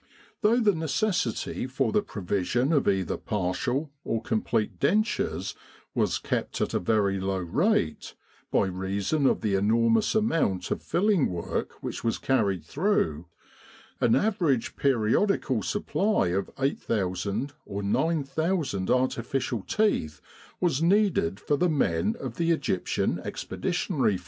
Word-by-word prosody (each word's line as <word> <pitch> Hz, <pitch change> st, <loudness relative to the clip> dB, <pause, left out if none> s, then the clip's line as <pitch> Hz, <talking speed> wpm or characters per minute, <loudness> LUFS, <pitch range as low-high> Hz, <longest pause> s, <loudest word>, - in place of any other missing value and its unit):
Though 230 Hz, +2 st, +4 dB
the 210 Hz, -4 st, +4 dB
necessity 160 Hz, -, -1 dB
for 130 Hz, -, 0 dB
the 210 Hz, -, +3 dB
provision 110 Hz, -, -1 dB
of 145 Hz, -, +2 dB
either 95 Hz, -3 st, +1 dB
partial 120 Hz, -, -2 dB
or 115 Hz, -, -1 dB
complete 110 Hz, -3 st, -1 dB
dentures 215 Hz, +2 st, 0 dB, 0.4 s
was -, -, +1 dB
kept -, -, -3 dB
at -, -, -1 dB
a -, -, +2 dB
very 100 Hz, 0 st, +1 dB
low 95 Hz, 0 st, -1 dB
rate, 95 Hz, -, 0 dB, 0.3 s
by -, -, +2 dB
reason 95 Hz, +10 st, 0 dB
of -, -, +1 dB
the 105 Hz, -2 st, 0 dB
enormous 115 Hz, -, +3 dB
amount 165 Hz, -, +1 dB
of -, -, -1 dB
filling 195 Hz, -3 st, +2 dB
work 85 Hz, -2 st, -4 dB
which -, -, -5 dB
was 115 Hz, -1 st, 0 dB
carried 100 Hz, -11 st, 0 dB
through, 85 Hz, -, 0 dB, 0.7 s
an 115 Hz, -, +4 dB
average 170 Hz, -, +1 dB
periodical 130 Hz, -, +1 dB
supply 205 Hz, -, 0 dB
of 95 Hz, +2 st, -1 dB
8,000 110 Hz, -1 st, -1 dB
or 100 Hz, +1 st, -4 dB
9,000 155 Hz, -, 0 dB
artificial 125 Hz, -1 st, 0 dB
teeth 205 Hz, -, 0 dB, 0.4 s
was 165 Hz, -5 st, +1 dB
needed 175 Hz, -, +2 dB
for 145 Hz, -, 0 dB
the 180 Hz, +4 st, +2 dB
men 100 Hz, -, +1 dB
of 125 Hz, -3 st, -6 dB
the 170 Hz, -, 0 dB
E.E.F. 100 Hz, -, -1 dB
120 Hz, 125 wpm, -27 LUFS, -, 0.7 s, Though